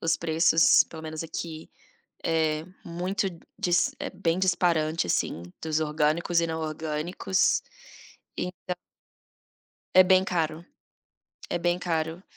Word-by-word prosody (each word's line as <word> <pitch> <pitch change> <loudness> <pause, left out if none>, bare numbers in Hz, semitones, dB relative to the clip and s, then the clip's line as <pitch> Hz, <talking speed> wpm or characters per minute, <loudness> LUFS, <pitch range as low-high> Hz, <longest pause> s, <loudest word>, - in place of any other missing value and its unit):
os 165 0 +1
preços 165 0 +5
pelo 160 -1 -10
menos 155 0 -5
aqui, 160 -1 -6 0.6
é 160 -1 +1 0.2
muito 185 +4 -2 0.3
dis 175 0 +2
é - - -3
bem 165 +1 -1
disparante 170 - +2
assim, 85 -1 -1 0.2
dos 155 -1 0
orgânicos 155 +3 +1
e 170 - 0
não 160 0 -3
orgânicos. 155 +4 0 0.8
E - - 0
então 180 0 -6 1.2
é 185 - +10
bem 185 0 +4
caro, 165 -2 -1 0.9
é - - 0
bem 175 +1 +1
caro. 165 0 -2
165 Hz, 120 wpm, -27 LUFS, 155-175 Hz, 1.2 s, é